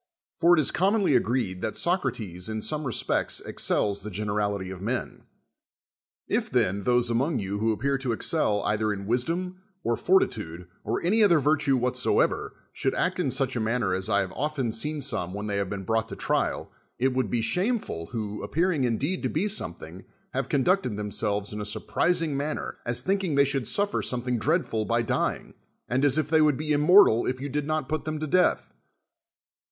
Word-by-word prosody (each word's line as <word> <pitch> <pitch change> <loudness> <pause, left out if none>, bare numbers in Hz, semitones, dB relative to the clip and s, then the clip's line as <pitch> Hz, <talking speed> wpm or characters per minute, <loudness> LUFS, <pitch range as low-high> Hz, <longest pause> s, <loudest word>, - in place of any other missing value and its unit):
For 170 +1 +4
it - - +2
is 150 - +3
commonly 195 -4 +2
agreed 115 -7 0
that - - -2
Socrates 115 - -1
in 110 -1 -4
some 155 -1 -1
respects 125 - 0
excels 100 -1 0
tlie 105 +2 -7
generality 100 -1 -2
of 95 -1 -8
men. 120 +5 -4 1.0
If, - - -1
then, 100 +2 +1
those 120 +2 +2
among 135 +6 +1
you 100 0 -3
who 110 +1 +2
appear 135 +5 -1
to 130 -2 -2
excel 110 -4 0
either 110 0 0
in 100 -1 -5
wisdom, 170 - -2 0.2
or 120 - +1
fortitude, 95 - 0 0.2
or 110 - -2
any 210 +6 +3
other 175 -5 +5
virtue 145 -1 +2
what 125 +1 0
soever, 125 - +1 0.2
should 135 - -1
act 185 0 0
in 165 -7 +1
such 135 0 0
a - - 0
manner 110 -3 0
as 95 +3 -1
I 100 -1 +3
have 95 - -4
often 140 -5 -2
seen 150 +7 0
so; 135 -8 -1
ne 90 - -9
when 105 +1 -4
they 100 -1 -2
have 100 -2 -1
been 100 -1 -5
brought 110 +3 0
to - - -6
trial, - - -1 0.3
it 130 +1 +1
would 130 0 0
be 120 - 0
shameful, 180 - -1
who, 105 -3 -5
appearing 165 -4 0
in 115 -2 0
deed 175 +7 -2
to - - -1
be 175 +7 0
something, 90 - -5 0.3
have - - -2
conducted 140 - +1
themselves 105 0 -2
in 105 - -4
a - - -3
surprising 160 +8 0
manner, 145 +2 -3
as 120 0 0
thinldng 190 -5 0
they 140 0 +5
should 135 -2 0
suffm 205 0 +1
something 125 -1 -1
dreadful 145 -6 0
by 115 +2 0
dying, - - -2 0.3
and 130 +3 0
as 145 0 +3
if 155 - +1
they 160 -1 +3
would 150 -3 +3
be 155 0 -3
immortal 150 - +5
if 130 0 -2
you 140 - -4
did 150 +2 -2 0.2
put 155 -2 -3
them 155 0 -3
to 155 - -2
death. 180 +5 +1
125 Hz, 195 wpm, -26 LUFS, 105-155 Hz, 1.0 s, other